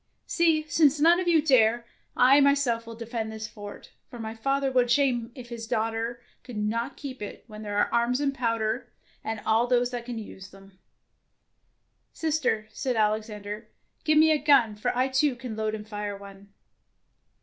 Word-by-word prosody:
" - - -50
See, 325 -2 +2
since 300 -1 +3
none 335 +4 +5
of 370 - -2
you 325 -3 +4
dare, 240 -5 +4 0.3
I 270 +3 +6
my 280 0 +5
self 235 -5 -1
will 230 - -8
defend 230 -1 -4
this 220 0 -6
fort, 205 -2 -11 0.2
for 245 - -10
my 220 -1 -5
father 275 +4 0
would 250 -1 +3
have 240 - -3
shame 240 -3 +2
if 245 -2 -10
his 230 -1 -7
daughter 225 +1 -2 0.2
could 245 -4 -8
not 230 +5 -2
keep 265 -4 -8
it, 205 - -7
when 215 -2 -10
there 205 -1 -4
are - - +1
arms 240 +2 +2
and 280 -1 0
powder 230 -2 -1 0.3
and 220 -1 -4 0.3
those 245 0 +2
that 240 -1 -5
can 240 -1 -5
use 195 -3 -9
them." 195 -1 -17 1.3
"Sister," 305 -9 0
said 255 +2 -2
Alexander, 210 -1 -2 0.4
"give 310 0 +3
me 315 +1 +6
a 305 - +3
gun, 275 -6 +4
for 215 +4 -2
I 255 +1 +3
too 265 +1 +1
can 240 -2 -7
load 215 0 -2
and 210 0 -9
fire 205 -1 -4
one." 200 0 -13
235 Hz, 185 wpm, -27 LUFS, 215-270 Hz, 1.3 s, I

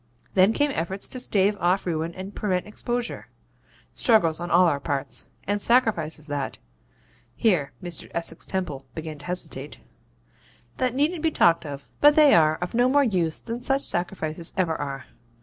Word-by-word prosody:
Then 190 +2 +5
came 290 +4 +1
efforts 190 -3 -2
to 255 - -5
stave 205 -4 +2
off 180 +3 +1
ruin 165 -1 -2
and 190 +2 -7
prevent 185 -4 -1
exposure; 240 +3 -4 0.7
struggles 175 - +3
on 175 0 -5
all 180 +2 +5
our 145 -5 +1
parts, 140 -1 -4 0.2
and 205 +1 -1
sacrifices, 200 - +2
that' 145 -2 -4 0.8
(here 170 -11 +1
Mr. 175 -2 -3
Essex 165 -1 -4
Temple 145 -8 -4
began 155 -2 -6
to 145 - -13
hesitate) 150 -5 -4 1.0
'that 255 -1 0
needn't 305 +4 +1
be 325 - +2
talked 170 - +3
of; 140 -1 -7
but 295 0 +6
they 300 -2 +7
are 155 -2 +5
of 180 - -5
no 245 +2 +3
more 285 +2 +4
use 180 - 0
than 235 +1 -5
such 270 +2 +1
sacrifices 170 -2 0
ever 170 -4 +1
are. 140 -3 -5
180 Hz, 165 wpm, -25 LUFS, 160-230 Hz, 1.0 s, they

